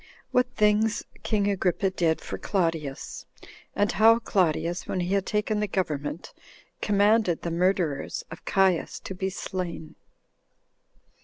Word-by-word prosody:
What 250 Hz, 0 st, +3 dB
Things 215 Hz, +2 st, +2 dB, 0.2 s
King 205 Hz, -2 st, 0 dB
Agrippa 195 Hz, -1 st, +1 dB
Did 165 Hz, -3 st, +1 dB
For -, -, -6 dB
Claudius; 165 Hz, -8 st, -2 dB, 0.5 s
And 205 Hz, 0 st, +2 dB
How 220 Hz, +4 st, +6 dB
Claudius 175 Hz, -5 st, 0 dB
When 185 Hz, -, -2 dB
He 180 Hz, +2 st, -1 dB
Had 195 Hz, -1 st, +1 dB
Taken 210 Hz, 0 st, 0 dB
The 210 Hz, -, 0 dB
Government 155 Hz, -5 st, -3 dB, 0.5 s
Commanded 205 Hz, -3 st, +3 dB
The 170 Hz, -, -2 dB
Murderers 170 Hz, -4 st, 0 dB
Of 160 Hz, -, -9 dB
Caius 190 Hz, -3 st, +1 dB
To -, -, -6 dB
Be 190 Hz, +1 st, -2 dB
Slain. 180 Hz, -4 st, -5 dB
190 Hz, 130 wpm, -26 LUFS, 170-210 Hz, 0.5 s, How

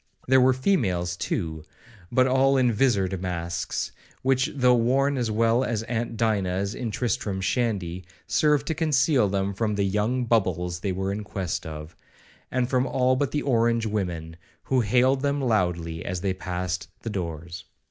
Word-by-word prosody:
There 130 Hz, 0 st, +5 dB
were 130 Hz, +1 st, +5 dB
females, 100 Hz, -, 0 dB
too, 80 Hz, -2 st, -3 dB, 0.5 s
but 130 Hz, +1 st, +4 dB
all 135 Hz, +1 st, +3 dB
in 125 Hz, -2 st, +3 dB
vizard 100 Hz, -6 st, +1 dB
masks, 85 Hz, -2 st, -3 dB, 0.3 s
which, 130 Hz, 0 st, +2 dB
though 125 Hz, -2 st, +4 dB
worn 135 Hz, +4 st, +2 dB
as 120 Hz, -4 st, -1 dB
well 115 Hz, +3 st, +2 dB
as 115 Hz, -4 st, -1 dB
aunt 115 Hz, 0 st, -3 dB
Dinah's 100 Hz, -3 st, 0 dB
in 120 Hz, -, -4 dB
Tristram 105 Hz, -3 st, -2 dB
Shandy, 95 Hz, -5 st, -1 dB, 0.2 s
served 150 Hz, -2 st, +2 dB
to 160 Hz, -, -1 dB
conceal 145 Hz, -7 st, +2 dB
them 100 Hz, 0 st, -1 dB
from 105 Hz, +1 st, -1 dB
the 100 Hz, -, +1 dB
'young 105 Hz, +6 st, 0 dB
bubbles' 90 Hz, -6 st, 0 dB
they 100 Hz, +1 st, -2 dB
were 95 Hz, +1 st, -2 dB
in 105 Hz, +1 st, -4 dB
quest 95 Hz, -5 st, -4 dB
of, 75 Hz, +1 st, -8 dB, 0.5 s
and 125 Hz, -1 st, 0 dB
from 130 Hz, 0 st, +1 dB
all 130 Hz, 0 st, +2 dB
but 140 Hz, +1 st, 0 dB
the 150 Hz, -, -2 dB
orange 115 Hz, -3 st, +2 dB
women, 85 Hz, -6 st, -3 dB, 0.3 s
who 130 Hz, -, +1 dB
hailed 130 Hz, +5 st, +3 dB
them 140 Hz, 0 st, 0 dB
loudly 90 Hz, -9 st, 0 dB
as 90 Hz, -1 st, -3 dB
they 95 Hz, 0 st, 0 dB
passed 90 Hz, -1 st, -3 dB, 0.2 s
the 115 Hz, -, -3 dB
doors. 85 Hz, -2 st, -5 dB
110 Hz, 165 wpm, -25 LUFS, 90-130 Hz, 0.5 s, There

